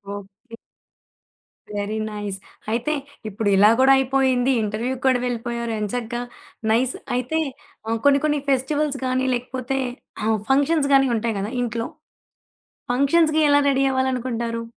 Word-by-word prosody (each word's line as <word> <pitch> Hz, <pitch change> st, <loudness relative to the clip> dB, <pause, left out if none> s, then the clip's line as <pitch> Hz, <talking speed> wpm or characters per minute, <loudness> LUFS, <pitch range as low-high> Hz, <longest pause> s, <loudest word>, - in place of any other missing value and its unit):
Okay. 205 Hz, +4 st, -12 dB, 1.2 s
Very 205 Hz, +2 st, -2 dB
nice. 205 Hz, -2 st, -4 dB, 0.3 s
అయితే 240 Hz, +7 st, 0 dB, 0.4 s
ఇప్పుడిలా 205 Hz, -1 st, +4 dB
గూడా 265 Hz, +1 st, +6 dB
అయిపోయింది. 265 Hz, -1 st, +2 dB
ఇంటర్వ్యూకి 235 Hz, +5 st, -3 dB
కూడా 255 Hz, -1 st, +4 dB
వెళ్ళిపోయారు 235 Hz, -1 st, -3 dB
ఎంచగ్గా. 235 Hz, +3 st, -3 dB, 0.5 s
నైస్. 250 Hz, +3 st, +2 dB, 0.2 s
అయితే 255 Hz, +6 st, -1 dB, 0.5 s
ఆహ్, 225 Hz, 0 st, 0 dB
కొన్ని, 280 Hz, 0 st, +6 dB
కొన్ని 295 Hz, -1 st, +1 dB
ఫెస్టివల్స్ 280 Hz, +2 st, +1 dB
గాని, 255 Hz, 0 st, 0 dB
లేకపోతే 255 Hz, +2 st, -3 dB, 0.5 s
ఆహ్, 220 Hz, 0 st, +1 dB
ఫంక్షన్స్ 285 Hz, +2 st, +3 dB
గాని 270 Hz, -1 st, +5 dB
ఉంటాయి 225 Hz, 0 st, -1 dB
గదా 205 Hz, +3 st, -3 dB
ఇంట్లో, 230 Hz, 0 st, -2 dB, 1.1 s
ఫంక్షన్స్‌‌కి 310 Hz, +3 st, +3 dB
ఎలా 285 Hz, -, +5 dB
రెడీ 270 Hz, 0 st, +2 dB
అవ్వాలనుకుంటారు? 250 Hz, -3 st, -1 dB
250 Hz, 120 wpm, -22 LUFS, 225-270 Hz, 1.2 s, గూడా